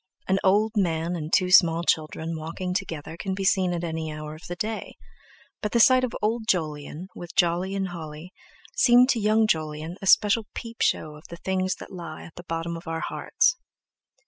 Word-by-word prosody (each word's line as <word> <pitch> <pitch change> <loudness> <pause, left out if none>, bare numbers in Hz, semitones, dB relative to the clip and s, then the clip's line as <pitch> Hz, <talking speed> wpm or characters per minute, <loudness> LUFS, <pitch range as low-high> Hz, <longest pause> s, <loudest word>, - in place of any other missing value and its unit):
An 190 +1 +2
old 210 +3 +3
man 170 -3 0
and 155 -1 -5
two 180 -1 +3
small 170 -3 +6
children 160 0 -1
walking 165 +4 -4
together 165 -5 -4
can 190 +2 -3
be 195 - -3
seen 185 -1 +2
at 175 -1 -3
any 160 -1 -3
hour 155 0 -7
of 155 +2 -11
the 175 - -5
day; 215 +4 -4 0.7
but 210 - -3
the 235 - +3
sight 255 +2 +6
of 250 - -2
old 220 +1 0
Jolyon, 155 -2 -2
with 175 -1 -10
Jolly 180 +1 +1
and 195 -1 -1
Holly 165 +1 -8 0.4
seemed 250 - +6
to 240 - +2
young 215 +1 +3
Jolyon 155 -2 -2
a 195 - -4
special 210 +2 +4
peep 230 -1 -7
show 155 - +1
of 150 - -17
the 170 - -8
things 185 0 -1
that - - -11
lie 170 -3 -7
at 165 - -12
the - - -9
bottom 165 +1 -3
of 165 0 -10
our 165 0 -3
hearts. - - +1
175 Hz, 200 wpm, -25 LUFS, 160-200 Hz, 0.7 s, small